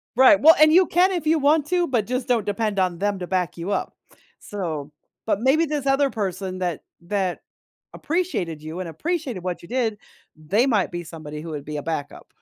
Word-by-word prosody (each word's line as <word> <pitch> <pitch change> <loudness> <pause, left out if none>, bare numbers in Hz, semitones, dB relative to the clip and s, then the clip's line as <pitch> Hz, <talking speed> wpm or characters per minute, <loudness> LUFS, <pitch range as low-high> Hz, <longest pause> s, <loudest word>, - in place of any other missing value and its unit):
Right. 265 +4 +7
Well, 320 +4 +8
and 310 0 +7
you 365 +1 +6
can 365 +3 +3
if 335 -4 -3
you 320 +1 +4
want 295 +1 +3
to, 355 -1 +1
but 230 -6 0
just 255 +1 -2
don't 235 -5 +1
depend 205 0 -1
on 180 -2 +1
them 200 +1 -1
to 180 - -5
back 180 -4 -1
you 170 +4 -4
up, - - -2 0.5
so 160 -8 -5 0.3
but 215 -2 0
maybe 285 +6 +3
this 295 -2 -3
other 275 0 +3
person 190 -4 -4
that 175 -4 -2 0.2
that 185 0 -2 0.5
appreciated 290 - -2
you 155 +3 -7
and 180 -3 -4
appreciated 270 - -3
what 180 -1 -3
you 170 - -13
did, 235 -4 -1 0.4
they 190 - +1
might 215 -8 +1
be 175 0 -5
somebody 155 -2 -8
who 165 - -8
would 145 -2 -6
be 150 0 -5
a 145 - -5
backup. 160 -3 -5
205 Hz, 210 wpm, -23 LUFS, 175-275 Hz, 0.5 s, Well